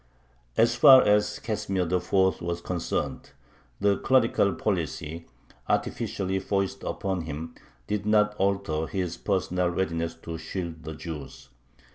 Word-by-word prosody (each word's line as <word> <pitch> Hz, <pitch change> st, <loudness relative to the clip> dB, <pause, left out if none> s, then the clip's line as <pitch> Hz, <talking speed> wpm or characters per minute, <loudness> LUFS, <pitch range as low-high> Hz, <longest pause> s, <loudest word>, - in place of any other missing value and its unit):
As 115 Hz, +1 st, +4 dB
far 130 Hz, +2 st, +8 dB
as 105 Hz, 0 st, +2 dB
Casimir 100 Hz, -4 st, -2 dB
IV. 90 Hz, +2 st, +1 dB
was 85 Hz, 0 st, -2 dB
concerned, 85 Hz, -1 st, -3 dB, 0.5 s
the 100 Hz, -1 st, +3 dB
clerical 115 Hz, -6 st, +3 dB
policy, 85 Hz, -4 st, -3 dB, 0.4 s
artificially 95 Hz, 0 st, -1 dB
foisted 95 Hz, 0 st, -2 dB
upon 95 Hz, -2 st, -2 dB
him, 80 Hz, +2 st, -6 dB, 0.3 s
did 105 Hz, +5 st, -2 dB
not 105 Hz, -1 st, +4 dB
alter 95 Hz, -5 st, 0 dB
his 90 Hz, -3 st, -2 dB
personal 90 Hz, -1 st, 0 dB
readiness 85 Hz, -2 st, -2 dB
to 80 Hz, 0 st, -7 dB
shield 80 Hz, -1 st, -6 dB
the 80 Hz, -1 st, -5 dB
Jews. 75 Hz, -5 st, -8 dB
95 Hz, 120 wpm, -27 LUFS, 85-100 Hz, 0.5 s, far